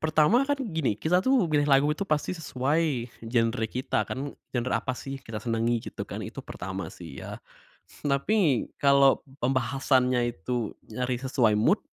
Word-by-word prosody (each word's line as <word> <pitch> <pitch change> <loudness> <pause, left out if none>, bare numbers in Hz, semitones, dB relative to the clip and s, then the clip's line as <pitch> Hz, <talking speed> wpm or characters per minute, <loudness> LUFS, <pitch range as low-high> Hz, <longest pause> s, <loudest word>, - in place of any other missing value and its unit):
pertama 155 +8 +4
kan 285 - +2
gini, 160 - -1
kita 180 +9 +2
tuh 260 -1 +3
pilih 150 -3 +1
lagu 140 +2 +4
itu 195 +6 -4
pasti 150 +3 0
sesuai 145 -4 -1
genre 115 0 0
kita 125 +4 -1
kan, 140 +2 -4 0.2
genre 125 +1 0
apa 130 - -1
sih 135 +1 -6
kita 110 -4 -7
senangi 115 0 0
gitu - - -6
kan, - - -5
itu - - -7
pertama 95 -2 -6
sih 80 -6 -10
ya. - - -7 0.7
Tapi, 145 - +2
kalo 140 -1 +5 0.2
pembahasannya 125 -1 +2
itu 115 +5 -3 0.2
nyari 125 +2 -2
sesuai 130 -4 +2
mood, 170 - +3
130 Hz, 155 wpm, -27 LUFS, 120-150 Hz, 0.7 s, kalo